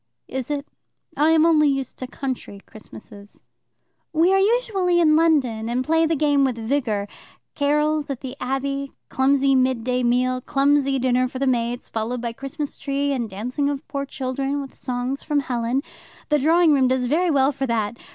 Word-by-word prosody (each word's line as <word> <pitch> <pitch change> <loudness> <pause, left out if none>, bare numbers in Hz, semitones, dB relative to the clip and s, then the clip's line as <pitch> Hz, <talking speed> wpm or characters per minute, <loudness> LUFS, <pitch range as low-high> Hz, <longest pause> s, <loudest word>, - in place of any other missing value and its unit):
"Is 265 0 -5
it? 290 -1 -3 0.5
I 300 +2 +3
am 320 0 +5
only 305 -3 +4
used 270 -2 -3
to 255 - -5
country 255 -6 -5
Christmases." 210 -1 -14 0.7
"We 335 +3 +3
are 385 - +4
usually 390 -5 +2
in 310 -2 +5
London, 265 -9 +2
and 250 +2 -1
play 325 +1 +3
the 325 - +1
game 290 -1 +2
with 260 -3 +1
vigour 225 -4 -1 0.5
carols 300 +1 +1
at 270 -3 -4
the 260 -1 -6
Abbey, 275 +2 -3 0.2
clumsy 270 +1 +2
midday 255 -1 +1
meal, 250 +1 +1
clumsy 275 0 +2
dinner 255 0 +1
for 260 - -7
the 275 - -1
maids, 240 -1 -1
followed 230 +3 -3
by 235 -1 -4
Christmas 280 +4 -6
tree 280 0 -1
and 240 -4 -2
dancing 250 +9 -2
of 285 +1 -5
poor 280 -1 -4
children, 270 +2 -3
with 275 -1 -7
songs 250 +2 -3
from 295 -2 0
Helen. 245 +1 -1 0.5
The 300 -1 +3
drawing 325 +2 +4
room 265 -2 +3
does 255 0 +1
very 335 +8 +1
well 275 -2 +3
for 270 -1 -3
that. 225 -2 -1
270 Hz, 175 wpm, -22 LUFS, 250-295 Hz, 0.7 s, am